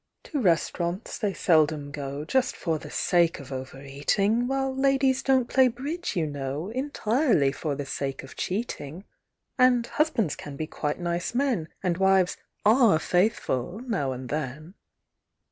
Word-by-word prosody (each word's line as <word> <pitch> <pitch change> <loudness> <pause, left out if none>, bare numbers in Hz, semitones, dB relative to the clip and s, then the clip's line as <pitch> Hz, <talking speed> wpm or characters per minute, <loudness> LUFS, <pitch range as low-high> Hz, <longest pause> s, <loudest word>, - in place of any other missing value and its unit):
To 290 - -3
restaurants 175 +1 0
they 210 -4 0
seldom 155 -5 +2
go, 140 0 -5
Just 260 +9 +1
for 160 -3 -2
the - - -10
sake 170 -2 +2
of 140 -1 -11
over 130 +1 -6
eating; 195 - +1
While 270 0 -1
ladies 270 -1 +2
donŌĆÖt 260 -3 +2
play 260 +1 +5
bridge, 285 +9 -4
you 170 -3 +1
know, 145 +4 -4
Entirely 250 - +1
for 145 +1 -3
the 145 0 -4
sake 135 0 -4
of 135 - -12
cheating; 185 - -4 0.6
And 250 -2 +5
husbands 260 - 0
can 145 -1 -8
be 155 - -3
quite 150 0 -3
nice 175 +4 -2
men, 245 - +1 0.2
And 180 -1 0
wives 190 -1 +3 0.3
are 225 -5 +6
faithful, 175 - 0
now 185 - -1
and 130 -1 -6
then. 150 +3 -4
175 Hz, 150 wpm, -26 LUFS, 145-245 Hz, 0.6 s, are